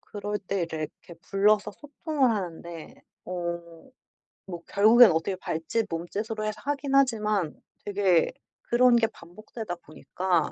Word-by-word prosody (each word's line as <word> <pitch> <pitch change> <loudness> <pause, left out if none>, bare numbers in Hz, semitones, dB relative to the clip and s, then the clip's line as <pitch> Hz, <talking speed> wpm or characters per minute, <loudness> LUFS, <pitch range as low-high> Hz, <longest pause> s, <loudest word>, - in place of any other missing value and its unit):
그럴 205 0 -5
때 190 -3 -2
래 160 -1 -3 0.2
이렇게 170 - -12
불러서 205 +1 +2
소통을 295 0 -1
하는데 170 -5 -6 0.2
어 170 +2 -6 0.6
뭐 175 -3 -7
결국엔 220 +2 +7
어떻게 165 +4 -1
발짓, 180 +6 -2
몸짓으로 205 +6 -4
해서 215 0 -3
하긴 280 -1 -2
하지만 215 - +2 0.3
되게 195 -4 +2 0.3
그런 245 0 +4
게 230 -1 +3
반복되다 215 +1 -8
보니까 170 +1 -2
200 Hz, 280 characters per minute, -27 LUFS, 170-225 Hz, 0.6 s, 결국엔